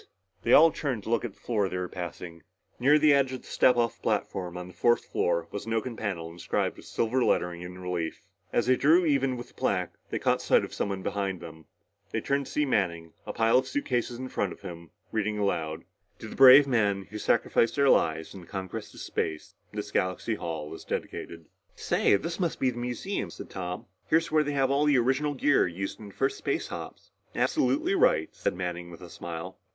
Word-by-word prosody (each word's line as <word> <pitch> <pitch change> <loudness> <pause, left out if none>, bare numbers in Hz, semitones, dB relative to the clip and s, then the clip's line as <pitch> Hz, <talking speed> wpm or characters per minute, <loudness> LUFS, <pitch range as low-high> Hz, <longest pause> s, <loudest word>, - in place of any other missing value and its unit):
They 120 - 0
all 160 +4 +8
turned 130 -10 -3
to 110 - -5
look 115 - +2
at 120 -5 -4
the - - -28
floor 105 -5 0
they 90 - -3
were 90 0 -2
passing. 85 -1 -7 0.4
Near 140 +5 +5
the 150 -1 +5
edge 135 -2 +2
of 130 - -5
the - - -15
step 125 -1 +4
off 115 -1 0
platform 90 -2 -2
on 90 0 -6
the 90 - -12
fourth 120 +5 +2
floor 85 -1 0
was 105 - -6
an 115 - -1
oaken 115 +2 -2
panel, 90 -7 -4
inscribed 85 0 -2
with - - -13
silver 125 +3 0
lettering 90 -5 +1
in 90 +1 -8
relief. 90 +1 -4 0.3
As 120 - +1
they 130 +1 +4
drew 160 +7 +4
even 135 -4 +1
with 120 - -8
the - - -23
plaque, 90 -3 -1 0.2
they - - -2
caught - - +1
sight - - +3
of - - -11
someone 95 -2 -2
behind 95 -2 -2
them. 80 -2 -11 0.4
They - - -1
turned 140 0 -1
to - - -9
see 150 - +1
Manning, 85 - -1
the - - -2
pile 115 +2 +4
of - - -4
suitcases 125 - -1
in 130 +1 -5
front 100 -6 -1
of - - -11
him, 85 -4 -9 0.2
reading 110 -1 -1
aloud. 80 -6 -1 0.2
"... - - -44
to - - -9
the - - -9
brave 135 +2 +9
men 105 -7 +1
who 105 - -5
sacrificed 115 - +2
their 140 -1 +3
lives 80 -9 +2
in 95 - -9
the 85 - -15
conquest 95 -2 -6
of - - -9
space, 80 -1 -3 0.2
this - - -5
Galaxy 95 +5 0
Hall 80 -6 -5
is - - -9
dedicated...." 85 -1 -5 0.3
"Say, - - +2
this 165 - -3
must 170 -4 -1
be 130 - +2
the 120 - -7
museum," 125 +11 -3
said - - -10
Tom. 90 -1 -5 0.2
"Here's 165 0 +2
where 155 -1 +4
they 145 0 -2
have 135 -1 +2
all 140 +2 +3
the 145 -2 +4
original 135 +4 +1
gear 145 -3 +3
used 95 +3 -5
in 105 - -9
the 100 - -14
first 135 +1 0
space - - -2
hops." - - -8 0.2
"Absolutely 315 +4 +1
right," 80 - +3
said - - -2
Manning 90 -1 -4
with 85 +1 -12
a 90 - -9
smile. 85 -1 -7
105 Hz, 220 wpm, -28 LUFS, 90-135 Hz, 0.4 s, brave